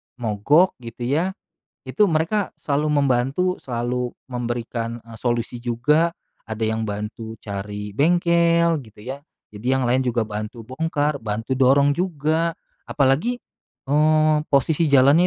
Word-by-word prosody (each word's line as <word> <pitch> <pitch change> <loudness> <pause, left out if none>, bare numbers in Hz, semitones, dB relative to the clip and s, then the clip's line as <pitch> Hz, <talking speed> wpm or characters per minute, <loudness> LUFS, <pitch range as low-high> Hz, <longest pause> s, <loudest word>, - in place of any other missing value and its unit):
mogok 125 - +2
gitu 120 0 -8
ya. 165 +9 0 0.5
Itu 210 - +3
mereka 165 +6 0
selalu 150 -1 0
membantu, 135 +5 +1 0.2
selalu 125 0 -2 0.2
memberikan, 120 -1 -3
e 115 -1 -12
solusi 120 +1 -2
juga. 150 +8 +2 0.3
Ada 110 +1 -5
yang 110 0 0
bantu 105 +2 -5
cari 105 0 -5
bengkel, 170 - +3
gitu 110 -5 -13
ya, 130 +4 -6 0.3
jadi 105 +3 -10
yang 130 - +1
lain 125 +1 +2
juga 120 -1 +1
bantu 110 +2 -6
bongkar, 145 +3 -1
bantu 115 +3 -3
dorong 140 +2 +5
juga, 165 0 0 0.3
apalagi, 140 - +2 0.6
eee, 155 +1 +4
posisi 150 +4 +2
jalannya 145 +5 +5
130 Hz, 125 wpm, -22 LUFS, 115-155 Hz, 0.6 s, dorong